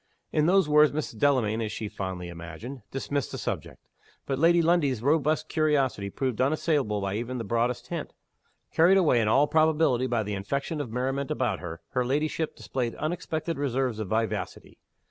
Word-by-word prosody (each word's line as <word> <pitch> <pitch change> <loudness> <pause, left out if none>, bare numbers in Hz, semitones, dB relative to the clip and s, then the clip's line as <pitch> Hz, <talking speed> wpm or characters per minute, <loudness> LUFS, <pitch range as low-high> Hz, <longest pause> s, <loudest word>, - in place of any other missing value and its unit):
In 155 0 +2
those 190 -2 +4
words 150 0 +5
Mrs. 145 -7 -4
Delamayn 115 -6 +2
(as 110 -1 -2
she 110 - -4
fondly 95 -4 -5
imagined) 85 - -8
dismissed 140 0 -3
the - - -5
subject. - - -5 0.4
But 135 -1 -2
Lady 170 +2 +5
Lundie's 160 -8 +2
robust 155 +2 +2
curiosity 140 -10 +1
proved 130 +2 -2
unassailable 135 -6 +1
by 100 0 -2
even 120 +3 -4
the 115 - -3
broadest 115 +3 -1
hint. - - -4 0.6
Carried 175 +4 +5
away, 150 -10 +4
in 105 - +1
all 135 +7 +5
probability, 155 -5 +2
by 120 -3 0
the 105 0 -4
infection 140 +10 -2
of 135 - -5
merriment 135 +3 -2
about 115 -6 -1
her, 85 -2 -7
her 125 - 0
ladyship 150 +4 -1
displayed 120 -3 -3
unexpected 160 -1 -3
reserves 130 -4 -1
of 110 - -3
vivacity. 110 -1 -3
130 Hz, 170 wpm, -27 LUFS, 110-150 Hz, 0.6 s, words